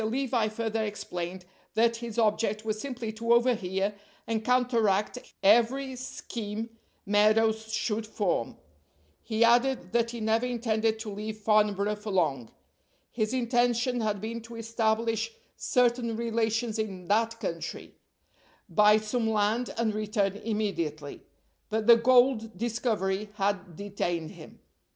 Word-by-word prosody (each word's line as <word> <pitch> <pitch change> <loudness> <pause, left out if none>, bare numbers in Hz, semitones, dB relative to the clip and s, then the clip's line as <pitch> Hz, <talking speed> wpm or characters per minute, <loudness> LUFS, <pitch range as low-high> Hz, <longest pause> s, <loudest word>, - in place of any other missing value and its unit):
Levi 240 0 0
further 220 0 -2
explained 180 -3 -5 0.3
that 230 +1 +3
his 235 -1 -7
object 215 -1 +1
was 215 -1 -2
simply 245 -5 -4
to 230 +2 -2
overhear 210 -5 +1 0.3
and 220 -1 -2
counteract 235 -3 +2 0.2
every 240 +6 +3
scheme 225 -3 -6 0.3
Meadows 220 +2 +3
should 220 0 -1
form. 205 -4 -1 0.6
He 220 0 +1
added 240 -4 +3
that 235 0 +1
he 235 0 -6
never 225 +2 +1
intended 225 -2 0
to 220 -2 -5
leave 215 +1 -5
Farnborough 210 -1 +2
for 210 +1 -7
long. 150 - 0 0.6
His 215 -2 -1
intention 245 0 +1
had 210 -2 -1
been 230 +3 -5
to 230 +1 -11
establish 225 0 -1 0.2
certain 240 -3 +1
relations 225 -1 -1
in 190 -5 -4
that 230 +2 +1
country, 165 -5 -5 0.7
buy 210 0 +5
some 220 +1 -1
land, 220 +3 +1
and 230 -2 +1
return 210 -2 0
immediately; 180 -10 -3 0.5
but 220 0 -1
the 235 +1 +9
gold 245 -1 +3
discovery 215 -4 -1
had 195 -3 -2
detained 175 -4 -3
him. - - -14
220 Hz, 125 wpm, -28 LUFS, 210-235 Hz, 0.7 s, the